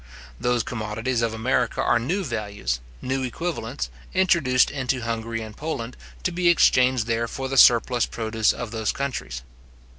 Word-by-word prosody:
Those 125 -1 +1
commodities 115 0 -2
of 115 -1 +1
America 110 +3 0
are 120 -2 +3
new 180 - -1
values, 105 - -3 0.2
new 130 +1 -1
equivalents, 125 - -4 0.2
introduced 170 -9 +3
into 130 -2 -1
Hungary 115 0 -3
and 110 -1 -10
Poland, 130 -6 -4 0.3
to 180 - 0
be 175 0 +2
exchanged 130 -7 +4
there 115 0 0
for 135 +3 -4
the 135 - -3
surplus 120 -1 +5
produce 110 -1 0
of 120 -3 -6
these 110 -2 -1
countries. 120 - -4
120 Hz, 150 wpm, -24 LUFS, 110-135 Hz, 0.3 s, surplus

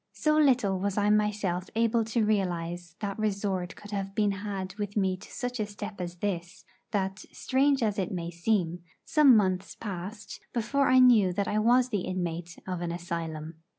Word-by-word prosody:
So 305 0 +1
little 250 -11 +3
was 200 +1 -2
I 205 0 +3
myself 210 -4 0
able 230 0 +2
to 225 0 +1
realise 175 -4 -1
that 200 0 -3
resort 195 -4 -1
could 205 - -12
have 195 -1 -3
been 210 -2 +2
had 195 -2 -4
with 205 0 -3
me 190 -2 +2
to 185 - -14
such 245 -1 -4
a 210 - -1
step 205 -1 -7
as 175 0 -5
this, 175 -2 -4 0.2
that, 195 -1 -1
strange 275 0 +2
as 210 -2 0
it 185 - -1
may 170 -2 -4
seem, 175 -1 0 0.3
some 285 -6 +6
months 190 -1 0
passed 200 +1 -7
before 270 +4 +1
I 255 - +6
knew 235 -7 +6
that 200 +2 -1
I 210 - +1
was 245 +3 +4
the 205 -5 -1
inmate 175 -2 -4
of 180 -2 -3
an 175 -1 -2
asylum. 165 -2 -5
200 Hz, 185 wpm, -28 LUFS, 180-215 Hz, 0.3 s, some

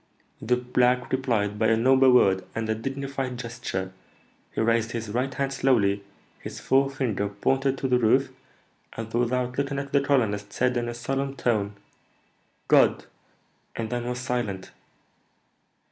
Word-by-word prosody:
The 125 +2 +1
black 125 0 +1
replied 115 -6 0
by 110 - +3
a 115 0 +3
noble 130 +2 +5
word 95 -6 +4
and 115 0 -2
a 110 - +1
dignified 135 +2 -4
gesture; 115 -6 -5 0.6
he - - -5
raised 115 0 +1
his 115 -2 -4
right 125 +5 -1
hand 135 0 -2
slowly, 100 -8 +2 0.4
his - - -8
forefinger 130 -7 +1
pointed 135 +6 0
to 135 - -2
the 125 -1 +3
roof, 125 +4 +3 0.6
and, 115 0 -7
without 125 +2 0
looking 140 0 -1
at 140 0 -5
the 140 - +4
colonist, 110 -8 0
said 125 0 +1
in 120 0 -1
a 120 - -5
solemn 135 +3 -3
tone, 105 -6 0 0.9
'God!' - - +4 0.7
and 115 0 -4
then 120 0 -2
was 125 - -3
silent. 120 -7 -3
125 Hz, 145 wpm, -26 LUFS, 110-135 Hz, 0.9 s, noble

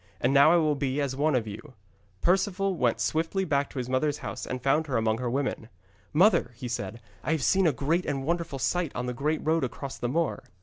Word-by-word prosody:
And 125 +3 +1
now 140 +3 +7
I - - +5
will 155 -3 +3
be 140 -1 -1
as 140 -2 -1
one 145 +1 +2
of 120 -3 +1
you.' 110 +7 -9 0.5
Perceval 195 +1 +1
went 120 -7 +1
swiftly 165 +9 0
back 140 -3 0
to - - -11
his 125 -1 -2
mother's 140 +3 0
house - - -6
and 125 - -3
found 145 +5 +1
her 130 - 0
among 110 0 +1
her 125 -1 -2
women. 130 -3 -2 0.4
'Mother,' 170 - +4
he 125 +1 -6
said, 115 -2 -4 0.2
'I 155 - +1
have 155 -5 -1
seen 190 +4 +4
a - - +4
great 160 +7 0
and 135 -2 -2
wonderful 170 -3 -1
sight 170 +3 0
on 125 - -2
the 125 - -3
great 150 +5 -1
road 160 0 +2
across 130 +2 -5
the 120 - -1
moor.' 165 +4 0
140 Hz, 230 wpm, -27 LUFS, 125-160 Hz, 0.5 s, now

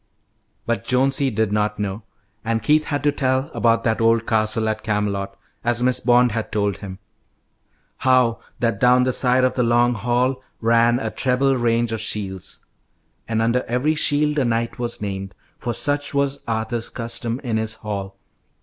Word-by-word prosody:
But 115 0 -1
Jonesy 135 +2 +2
did 110 -3 0
not 105 0 0
know, 100 +1 -3 0.4
and 115 -1 -1
Keith 155 +5 +3
had 145 -2 -2
to 145 - +3
tell 130 0 0
about 115 -1 +2
that 110 -1 0
old 115 0 +3
castle 110 0 +1
at 110 - -2
Camelot, 100 -2 -2 0.3
as 120 0 0
Miss 125 0 +2
Bond 125 -1 +4
had 115 0 -3
told 105 -2 0
him. 95 -2 -8 1.0
How 125 -3 +3 0.2
that 115 -4 0
down 125 +2 +5
the 130 0 +1
side 125 0 +3
of 130 - +2
the 125 - 0
long 120 +1 +3
hall 125 +3 0 0.2
ran 115 +1 +3
a - - -3
treble 135 +1 +1
range 120 -1 +1
of 110 -1 -3
shields, 95 -4 -5 0.6
"And 115 0 0
under 115 +2 +1
every 125 +6 +1
shield 150 -1 +1
a - - +2
knight 115 +1 -1
was 120 -3 -3
named, 95 -2 -5 0.2
For 120 - -3
such 145 +4 -1
was 140 0 0
Arthur's 115 +1 -2
custom 115 0 -3
in 115 -4 -1
his 110 0 0
hall. 100 -3 -5
115 Hz, 170 wpm, -21 LUFS, 110-125 Hz, 1.0 s, down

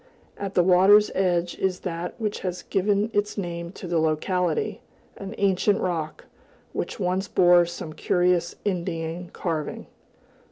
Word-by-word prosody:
At 200 -1 -5
the 180 - +5
water's 190 +4 +6
edge 175 -2 0
is 190 -1 -1
that 175 +3 -5
which 210 -2 -2
has 180 -1 -4
given 205 +3 +1
its 205 +1 0
name 170 -3 -4
to 190 - -8
the 170 -1 +1
locality, 180 - 0 0.4
an 195 +2 -7
ancient 200 +1 +2
rock, 160 -4 -3 0.5
which - - -4
once 185 +1 0
bore 175 -1 +5
some 165 -2 -7
curious 175 0 +1
Indian 170 -2 -3
carving. 160 -4 -3
180 Hz, 135 wpm, -25 LUFS, 170-195 Hz, 0.5 s, water's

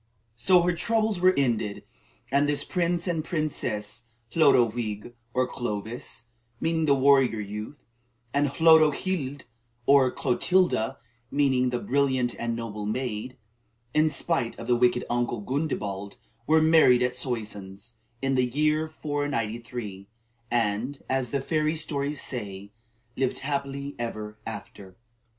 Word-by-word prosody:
So 180 +9 +4
her 175 0 +2
troubles 215 +2 +1
were 185 0 +5
ended, 115 -6 0 0.5
and 140 +1 +3
this 145 0 +2
prince 175 -1 -1
and 165 -3 0
princess, 115 - -2 0.3
Hlodo 145 -6 +6
wig, 110 -1 -4 0.2
or 130 +1 +1
Clovis 115 0 -5 0.3
(meaning 160 -1 +1
the 140 -2 +4
"warrior 135 -4 +4
youth"), 105 +6 -6 0.6
and 145 +1 +3
Hlodo 160 +2 +6
hilde, 145 -8 -3 0.4
or 135 -1 +6
Clotilda 140 -1 +1 0.3
(meaning 130 -2 +2
the 125 - -1
"brilliant 130 -1 +1
and 120 0 -1
noble 105 -3 -5
maid"), 125 +1 -3 0.6
in 155 +1 +4
spite 150 -4 -1
of 115 - -7
the 120 - +3
wicked 125 0 +2
uncle 120 -1 -1
Gundebald, 100 -6 -3 0.3
were 160 0 +5
married 155 -6 +6
at 125 0 +1
Soissons, 110 -3 -4 0.3
in 135 0 +1
the 125 -1 +3
year 150 +5 +1
493, 120 -9 -4 0.4
and, 120 +4 0
as 130 -2 0
the 140 +3 -1
fairy 155 +2 0
stories 145 -2 -2
say, 100 -6 -5 0.4
"lived 130 -2 0
happily 140 0 -3
together - - -22 0.2
ever 105 0 -8
after." 100 -3 -8
130 Hz, 130 wpm, -26 LUFS, 115-150 Hz, 0.6 s, Hlodo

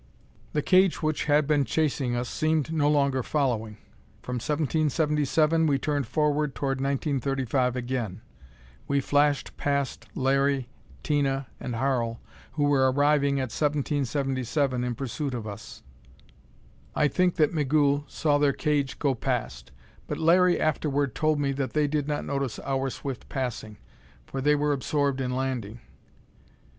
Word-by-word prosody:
The 150 - 0
cage 185 -2 +3
which 155 -1 0
had 150 0 +3
been 145 -1 +2
chasing 135 -4 0
us 120 +1 -2
seemed 155 +2 0
no 145 -2 +2
longer 140 -3 +2
following. 115 -7 -1 0.5
From 125 0 -3
1777, 155 +2 +1
we 140 -2 +3
turned 145 -2 -1
forward 150 0 0
toward 135 -1 -1
1935 135 -2 0
again. 120 -6 -3 0.7
We 140 0 +2
flashed 145 +1 +1
past 140 -2 -2
Larry, 135 -1 +1 0.4
Tina 140 -2 0
and 120 - -4
Harl 120 -2 -1 0.3
who 150 - 0
were 135 -2 +3
arriving 140 0 +2
at 130 -4 -3
1777 140 -3 0
in 125 -1 -2
pursuit 135 +2 -3
of 115 -3 -5
us. 105 0 -9 1.1
I 150 - +3
think 180 +3 +1
that 155 0 +2
Migul 145 -1 +2
saw 145 0 +1
their 145 -1 +3
cage 145 -3 -1
go 140 -3 +1
past; 60 - -3 0.4
but - - -3
Larry 175 +2 +4
afterward 145 -4 0
told 155 -1 +1
me 140 -1 +1
that 135 -1 -3
they 150 -1 +2
did 145 0 -1
not 145 -1 -2
notice 135 -5 -2
our 135 0 -1
swift 135 0 -6
passing, 120 -6 -4 0.5
for 135 - -5
they 150 +2 +4
were 150 0 +1
absorbed 140 0 0
in 125 -1 -2
landing. 125 -4 -3
140 Hz, 140 wpm, -26 LUFS, 130-150 Hz, 1.1 s, Larry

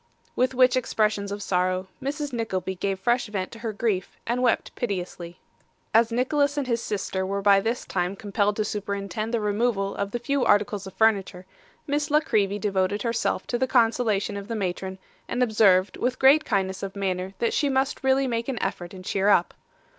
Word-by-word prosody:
With 255 +1 +1
which 255 0 +5
expressions 215 -5 0
of 205 0 -4
sorrow, 185 0 0
Mrs. 285 +1 -3
Nickleby 190 -5 -2
gave 190 +1 -2
fresh 240 +4 +1
vent 195 -3 -4
to 230 - -10
her 225 -1 -3
grief, 210 -3 -2
and 240 +2 -1
wept 245 -2 +1
piteously. 180 -5 -4 0.6
As 230 +1 +4
Nicholas 285 +4 +1
and 285 - 0
his 235 -2 -1
sister 195 -3 -2
were 200 +1 -2
by 200 -1 +6
this 225 +4 -2
time 180 +1 -2
compelled 205 0 0
to 215 - -1
superintend 205 +1 -3
the 235 - +1
removal 210 -1 0
of 200 - -3
the 240 - -3
few 275 +2 0
articles 205 -1 +2
of 190 - -11
furniture, 200 -4 +1 0.4
Miss 290 +1 -1
La 300 +1 +5
Creevy 210 -9 0
devoted 200 0 0
herself 230 -1 -1
to 240 - -2
the 260 - +1
consolation 225 -5 +2
of 200 0 -7
the 230 - -3
matron, 190 -1 -3 0.3
and 250 +1 0
observed 205 -5 +3
with 255 +1 -1
great 280 +4 +5
kindness 190 -3 -1
of 195 0 -5
manner 190 -1 -2
that 235 - 0
she 290 - +1
must 265 +1 0
really 265 +1 +3
make 235 -2 -2
an 260 - -2
effort, 175 0 -4
and 185 -1 -11
cheer 195 +1 +1
up. 175 -4 +3
210 Hz, 190 wpm, -25 LUFS, 195-245 Hz, 0.6 s, by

